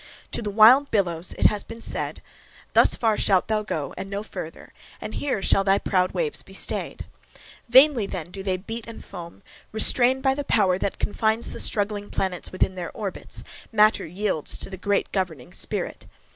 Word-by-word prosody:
To - - -1
the 210 - -3
wild 230 +7 +6
billows 175 -4 0
it - - 0
has 210 -1 +3
been 230 0 -10
said, - - -3 0.5
"thus - - +5
far 220 -3 +1
shalt 190 -2 +2
thou 215 -1 0
go, 155 -9 -4
and 195 +1 -6
no 200 +1 -4
further; 165 -6 -9 0.3
and - - -7
here 260 -9 -2
shall 195 - +3
thy 195 0 +3
proud 185 -2 +1
waves 465 -3 -1
be - - -15
stayed." - - -2 0.6
Vainly 260 -3 +6
then 175 -3 -6
do 195 - -6
they 190 -1 -1
beat 225 +5 -7
and 230 - -10
foam, 175 0 -10 0.3
restrained 250 +4 +4
by 265 -1 +3
the 285 +1 -4
power 195 -8 +2
that 195 - -2
confines 220 +2 -1
the - - -7
struggling 205 -1 -1
planets 185 -2 -3
within 185 0 0
their 180 -2 -5
orbits, 200 -4 -6 0.3
matter 215 -4 +3
yields 185 -2 -1
to - - -4
the - - -5
great 200 +2 -1
governing 170 -10 -3
Spirit. - - -3
205 Hz, 185 wpm, -24 LUFS, 185-225 Hz, 0.6 s, wild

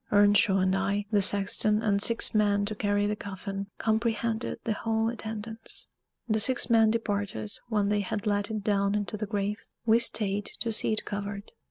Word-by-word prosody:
Earnshaw 205 -1 +4
and 190 0 +1
I, 200 +1 -1
the 205 -2 +3
sexton, 205 +2 +3
and 200 -2 +1
six 230 +2 +4
men 205 -1 +2
to 215 - -1
carry 205 -1 0
the 210 +1 -1
coffin, 195 0 -6
comprehended 225 0 -1
the 225 - -1
whole 225 +1 -1
attendance. 225 0 -5 0.4
The 220 -1 +1
six 245 +2 +3
men 225 -1 +5
departed 205 - -2 0.2
when 205 -3 +1
they 210 0 +1
had 205 +2 -4
let 205 0 0
it 215 -2 -4
down 200 -1 +1
into 210 0 -3
the 210 0 -4
grave: 205 0 -3 0.2
we 225 0 +4
stayed 205 -3 0
to 230 -1 0
see 220 - +3
it 215 - -2
covered. 205 0 -6
210 Hz, 180 wpm, -27 LUFS, 200-220 Hz, 0.4 s, men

